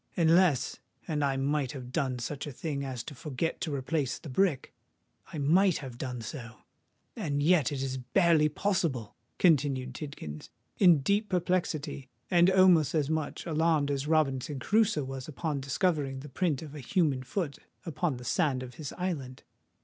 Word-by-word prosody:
Unless—and 160 -4 +1
I 135 -1 +1
might 140 -1 0
have 125 -3 -8
done 130 -2 -1
such 140 +5 -5
a - - -5
thing 140 +1 -4
as 130 -4 -4
to 150 - -8
forget 150 +4 -3
to 150 -3 -2
replace 135 0 -1
the 155 - -10
brick,—I 160 0 -3
might 175 +6 +4
have 130 -4 -8
done 125 -3 -4
so;—and 130 +4 -7
yet 160 -4 +4
it 135 -2 -2
is 130 -1 -3
barely 155 +4 +3
possible!" 150 - -1 0.2
continued 135 -6 +2
Tidkins, 80 - -7 0.3
in 175 -6 +6
deep 205 +8 +1
perplexity, 170 -7 -1 0.2
and 175 0 +6
almost 185 -6 +5
as 150 -1 +1
much 155 -2 -2
alarmed 160 -3 +2
as 140 +1 -2
Robinson 145 -3 +1
Crusoe 210 0 +2
was 135 -1 -6
upon 155 -1 -3
discovering 140 -1 0
the 150 - -9
print 155 -1 -1
of 150 - -9
the 150 - -8
human 145 -1 +1
foot 145 +2 -3 0.3
upon 160 -3 -1
the 125 - -10
sand 135 -2 +1
of 125 0 -9
his 145 - -5
island. 145 -9 -4
145 Hz, 155 wpm, -29 LUFS, 130-165 Hz, 0.3 s, in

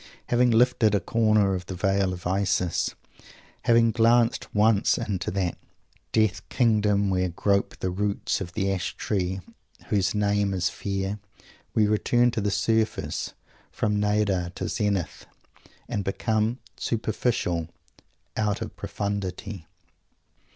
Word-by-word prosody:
Having 125 +1 +4
lifted 115 -2 +4
a - - +3
corner 110 -3 +2
of 90 -1 -4
the 95 - -5
Veil 95 0 +1
of 90 -2 -7
Isis, 95 -2 0 0.7
having 115 -1 +5
glanced 115 +1 +3
once 105 -1 +3
into 95 -4 -2
that 90 -2 -2 0.5
Death 110 -4 +2
Kingdom 105 -4 +2
where 90 -1 +1
grope 100 +3 0
the 95 - -2
roots 100 +2 -1
of 85 -2 -6
the 95 -1 0
Ash 90 -2 -3
Tree 95 -2 -2 0.5
whose 95 -2 +1
name 100 -1 +1
is 90 -2 +1
Fear, 100 +1 -3 0.6
we 110 - +4
return 120 +3 +3
to 110 - -2
the 100 - 0
surface, 110 +3 0 0.4
from 105 -1 0
Nadir 105 -4 +1
to - - -3
Zenith, 100 -5 -2 0.6
and 100 - -2
become 110 +4 0 0.2
"superficial" 110 -7 -1 0.7
"out 105 -2 0
of - - -6
profundity." 100 -2 -4
100 Hz, 125 wpm, -26 LUFS, 95-110 Hz, 0.7 s, having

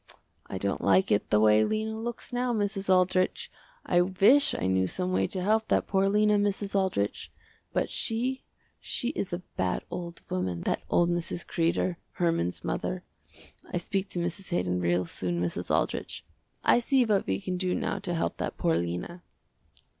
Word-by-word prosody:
I - - -5
don't 100 +1 -2
like 95 -1 +3
it 105 - +2
the 105 - +4
way 110 0 +5
Lena 220 - -1
looks 235 +2 -6
now 245 0 0
Mrs. 205 -3 -1
Aldrich. 185 0 +2 0.3
I 175 -1 +3
wish 205 +11 +4
I - - -2
knew 95 0 +2
some 180 - -2
way - - +2
to 185 -2 -4
help 220 +2 +2
that - - +2
poor 195 0 +2
Lena, 210 0 +3
Mrs. 205 0 -1
Aldrich, 190 - 0 0.4
but - - 0
she 250 +4 -1 0.4
she 240 - -1
is 200 -8 -3
a 175 +1 -4
bad 90 -1 0
old 170 -1 -6
woman, 90 -2 -2
that - - -1
old 175 0 +3
Mrs. 175 0 -2
Kreder, 170 +1 0 0.2
Herman's 165 - 0
mother. - - -2 0.7
I - - -1
speak 190 +2 -2
to 175 - -4
Mrs. 175 +3 -4
Haydon 90 0 0
real 90 +1 +1
soon, 85 0 -3
Mrs. 85 -1 -2
Aldrich, - - -1 0.4
I - - +5
see 255 +1 +3
what 210 -3 +1
we 95 0 0
can 180 - -3
do 180 0 0
now - - -2
to 175 - -2
help 165 - -1
that - - -4
poor 80 - +2
Lena." 90 - -4
180 Hz, 175 wpm, -28 LUFS, -, 0.7 s, way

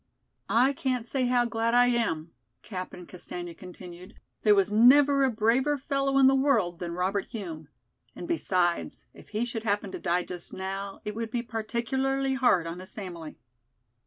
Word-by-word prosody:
"I 255 +4 +4
can't 255 -3 -2
say 255 +1 -1
how 245 -1 +3
glad 230 0 0
I 245 0 +6
am," 215 -10 0 0.3
Captain 185 -3 -7
Castaigne 175 -1 -8
continued. 180 0 -11 0.3
"There 210 -1 +5
was 195 0 +2
never 275 +5 +6
a 265 - +4
braver 245 +6 +2
fellow 275 0 0
in 270 - +6
the 265 - +6
world 235 -11 +2
than 170 -1 -4
Robert 190 +2 -1
Hume. 165 -8 -7 0.5
And - - -7
besides, 180 - 0
if - - -16
he 220 +2 -1
should 230 -2 -4
happen 205 -2 -1
to - - -6
die 175 +1 0
just 175 -1 -9
now, 195 +1 -5
it 210 - -3
would 225 +1 -4
be 235 +1 -2
particularly 265 +4 -1
hard 245 -10 +3
on 165 +2 -5
his 185 +1 -11
family. 175 -6 -8
220 Hz, 170 wpm, -27 LUFS, 180-255 Hz, 0.5 s, I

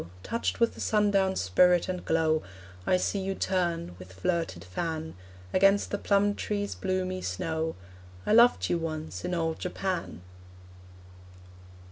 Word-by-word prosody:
Touched 230 - -2
with 235 -1 +3
the - - -9
sundown's 200 -3 +2
spirit 175 - +4
and 180 -1 -3
glow, 160 -1 +2 0.5
I 185 - +4
see 200 +2 -1
you 195 0 -2
turn, 170 - -1
with 90 0 -11
flirted 165 - -2
fan, 160 - -4 0.4
Against 195 +2 +4
the 205 - -1
plum 205 0 +2
tree's 205 0 -2
bloomy 185 -1 -2
snow... 160 - -2 0.5
I - - +2
loved 235 +2 +6
you 175 - 0
once 160 -1 -5
in 180 0 -1
old 165 -1 -1
Japan! 180 - -3
180 Hz, 135 wpm, -28 LUFS, 160-195 Hz, 0.5 s, loved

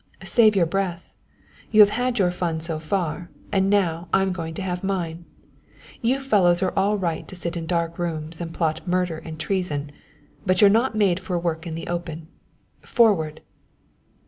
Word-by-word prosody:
"Save 220 -3 +4
your 180 -3 +4
breath! 180 0 -3 0.6
You've 210 -2 +7
had 245 +1 -1
your 185 -4 +3
fun 170 -2 -2
so 160 -1 -2
far, 170 0 -2 0.2
and 195 -1 +2
now 175 -4 +1
I'm 190 -1 +2
going 165 -2 -5
to 195 - -4
have 180 -1 -3
mine. 175 -3 -3 0.8
You 250 +4 +1
fellows 190 -9 +3
are 185 - 0
all 200 +2 +2
right 170 -5 -2
to - - -10
sit 170 -1 -4
in 165 -1 -4
dark 170 -1 -1
rooms 160 -1 -4
and 165 -1 -4
plot 160 0 -2
murder 180 -2 0
and 160 -1 -9
treason; 155 -6 -2 0.5
but 185 +2 +2
you're 200 -1 +7
not 230 +2 +2
made 195 -4 +2
for 185 -1 -3
work 170 -1 -2
in 160 - -4
the 165 - -6
open. 170 -2 -5 0.5
Forward!" 165 -10 +2
175 Hz, 170 wpm, -23 LUFS, 165-195 Hz, 0.8 s, You've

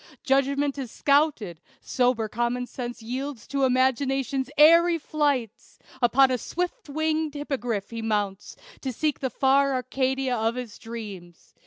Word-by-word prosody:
Judgment 275 +1 +1
is 260 -3 -5
scouted 280 - +1 0.2
sober 245 -3 0
common 240 +3 -1
sense 240 -2 -7
Yields 255 +1 -5
to 275 0 0
imagination's 265 +1 +1
airy 335 +3 +6
flights; 285 -8 -2 0.2
Upon 260 +2 +5
a 250 - 0
swift 360 - -4
winged 315 0 -1
hippogriff 245 -8 -3
he 230 0 -5
mounts, 205 -3 -2 0.3
To 265 - -3
seek 300 +4 -1
the 260 - -1
fair 270 +2 +2
Arcadia 260 0 -1
of 225 +1 0
his 245 -4 -7
dreams. 205 -7 -9
260 Hz, 135 wpm, -25 LUFS, 235-280 Hz, 0.3 s, airy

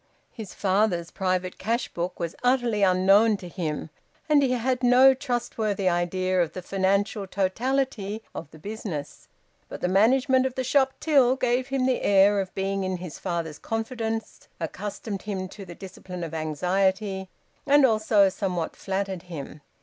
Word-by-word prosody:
His 215 -4 -9
father's 190 -3 +1
private 185 -1 -2
cash 230 +4 -1
book 175 +1 -4
was 170 -1 -3
utterly 245 -4 +2
unknown 195 +3 +4
to 180 - -9
him, 160 -3 -4 0.4
and 300 -2 +5
he 260 -2 +2
had 250 +1 0
no 255 +2 +7
trustworthy 235 -7 -2
idea 185 +1 +1
of 165 -2 -1
the 185 - -7
financial 195 +2 0
totality 220 +2 -1
of 160 - -7
the 155 - -14
business; 170 -5 -6 0.4
but - - -7
the - - 0
management 255 +7 +3
of 260 - -8
the 260 - -1
shop 265 +1 +2
till 270 -5 +4
gave 250 0 0
him 270 -2 0
the 260 -1 +1
air 200 +1 +4
of 190 -1 -3
being 195 0 -1
in 185 -1 -2
his 175 -3 -8
father's 170 -4 -3
confidence 225 -1 -4
accustomed 200 +4 -5
him 190 -3 -4
to 195 0 -10
the 175 -1 -10
discipline 180 -1 -8
of 165 -1 -6
anxiety, 190 +5 -1 0.4
and 285 0 +6
also 215 -3 +4
somewhat 185 -4 -3
flattered 190 -2 -3
him. 155 -4 -8
195 Hz, 155 wpm, -25 LUFS, 185-240 Hz, 0.4 s, no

